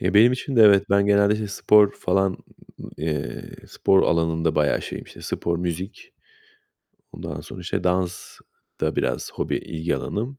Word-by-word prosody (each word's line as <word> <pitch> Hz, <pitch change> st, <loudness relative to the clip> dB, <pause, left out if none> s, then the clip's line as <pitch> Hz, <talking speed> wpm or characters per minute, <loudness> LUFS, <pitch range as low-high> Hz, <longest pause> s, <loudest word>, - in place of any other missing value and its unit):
Ya, 95 Hz, +3 st, -1 dB
benim 115 Hz, +4 st, +6 dB
için 130 Hz, +1 st, -4 dB
de 115 Hz, -, +7 dB
evet. 100 Hz, -2 st, +6 dB
Ben 100 Hz, 0 st, +3 dB
genelde, 100 Hz, 0 st, +4 dB
işte, 105 Hz, -1 st, -3 dB
spor 105 Hz, +1 st, +4 dB
falan, 95 Hz, -1 st, 0 dB, 0.7 s
ı -, -, -8 dB
eee, 75 Hz, -2 st, -4 dB, 0.2 s
spor 95 Hz, -1 st, +2 dB
alanında 80 Hz, -1 st, +1 dB
bayağı 75 Hz, -1 st, +1 dB
şeyim. -, -, -7 dB
İşte, -, -, -14 dB
spor, 85 Hz, 0 st, -2 dB
müzik, 90 Hz, -, -5 dB, 1.0 s
ondan -, -, -7 dB
sonra, 90 Hz, -, -10 dB
işte, 90 Hz, -, -3 dB
dans 90 Hz, 0 st, -2 dB, 0.4 s
da -, -, -1 dB
biraz -, -, -2 dB
hobi -, -, -2 dB
ilgi 80 Hz, +1 st, -3 dB
alanım. 125 Hz, +6 st, -4 dB
95 Hz, 160 wpm, -23 LUFS, 85-105 Hz, 1.0 s, de